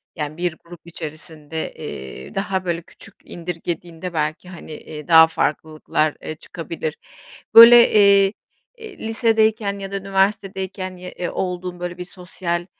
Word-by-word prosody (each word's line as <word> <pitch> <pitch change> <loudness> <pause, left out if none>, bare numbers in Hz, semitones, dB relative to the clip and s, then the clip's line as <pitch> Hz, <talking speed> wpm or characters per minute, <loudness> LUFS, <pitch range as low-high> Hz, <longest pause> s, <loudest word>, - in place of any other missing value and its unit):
yani 150 +1 -5
bir 175 -2 -2
grup 175 0 -12
içerisinde, 160 -1 -7
eee, 65 0 -9
daha 195 -1 -2
böyle 170 -1 -1
küçük - - -14
indirgediğinde 175 0 -6
belki 155 +3 -2
hani, 170 -3 -11
eee, 150 -1 -9
daha 160 -1 +8
farklılıklar, 155 -1 -1
eee, 155 - -6
çıkabilir. 160 -1 -6 0.6
Böyle, 235 +1 +10
eee, 200 -1 +5 0.4
eee, 440 -3 -11
lisedeyken 220 -3 +1
ya 195 0 -7
da 200 - -4
üniversitedeyken 190 -1 -2
ye, 180 0 -9
ııı, 175 - -2
olduğun 180 -1 -4
böyle 175 0 -5
bir 180 - -5
sosyal, 180 -1 -4
180 Hz, 135 wpm, -21 LUFS, 160-195 Hz, 0.6 s, Böyle